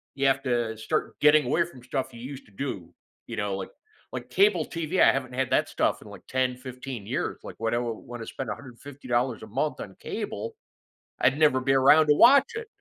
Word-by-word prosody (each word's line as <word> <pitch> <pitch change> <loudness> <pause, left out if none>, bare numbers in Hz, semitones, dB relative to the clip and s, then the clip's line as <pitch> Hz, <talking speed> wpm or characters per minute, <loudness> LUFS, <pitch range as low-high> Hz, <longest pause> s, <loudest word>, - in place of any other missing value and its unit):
you 135 0 +2
have 135 0 +2
to 120 -4 -1
start 155 +8 -2
getting 150 -1 +5
away 125 - +2
from 130 -8 -14
stuff 130 +1 -3
you 115 - -10
used 135 +1 -8
to 105 - -22
do, 95 -8 -5 0.3
you 115 - -5
know, 105 -3 -1
like 95 - -6 0.4
like, - - -6
cable 405 +2 +3
TV. 170 +2 -2
I - - +8
haven't 130 -2 -3
had 130 0 -1
that - - +2
stuff - - 0
in - - -14
like - - -11
10, 130 -1 0
15 125 -4 -8
years, - - -2
like, - - -8
when 115 0 -1
I 120 - +2
want 120 0 -5
to 115 - -7
spend 135 - -5
$150 125 0 -3
a - - -8
month 135 +7 -2
on - - -8
cable, 465 -2 -5 0.7
I'd 135 +3 +3
never 140 -4 +4
be 135 - +1
around 140 +4 +6
to 150 - +5
watch 275 - +6
it. 445 0 -5
130 Hz, 215 wpm, -27 LUFS, 120-145 Hz, 0.7 s, I